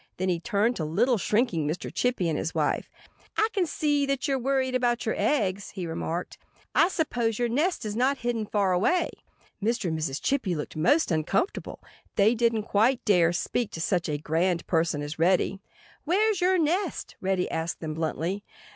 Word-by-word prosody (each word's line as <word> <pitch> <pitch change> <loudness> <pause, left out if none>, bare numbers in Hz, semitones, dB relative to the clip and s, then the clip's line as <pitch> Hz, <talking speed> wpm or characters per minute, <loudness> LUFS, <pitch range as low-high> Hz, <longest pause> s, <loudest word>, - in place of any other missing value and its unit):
Then 185 +1 -1
he 175 -2 +1
turned 230 +4 +1
to 160 - -2
little, 215 +10 +2
shrinking 205 - +1
Mr. 155 +4 -4
Chippy 245 -8 0
and 160 - 0
his 160 - -3
wife. - - 0 0.5
"I 435 - +3
can 375 -5 +1
see 290 -2 +1
that 275 0 -1
you're 270 -1 +1
worried 260 0 0
about 245 -2 +1
your 220 - +1
eggs," 200 -4 0
he 185 -3 -3
remarked. 165 +1 -4 0.3
"I - - +5
suppose 240 - -1
your 240 - +1
nest 300 +3 0
is 210 - -3
hidden 240 -1 0
not 215 - -7
far 200 -3 +2
away." 220 - +2 0.5
Mr. 220 -3 0
and 160 -1 -2
Mrs. 140 -3 -2
Chippy 240 -11 0
looked 150 - -5
most 285 - +3
uncomfortable. 160 - -1 0.3
They 210 +3 +4
didn't 230 -2 +1
quite 225 +5 +2
dare 175 -5 +4
speak 215 +6 -1
to - - -5
such 175 0 0
a 150 - 0
grand 165 +3 0
person 160 -3 0
as 145 +2 -6
Reddy. 185 +3 +2 0.4
"Where's 400 +4 +2
your 370 +1 +4
nest?" 345 +3 -1
Reddy 190 -1 0
asked 160 +1 -2
them 155 -2 -4
bluntly. 165 +5 -2
210 Hz, 180 wpm, -27 LUFS, 170-260 Hz, 0.5 s, I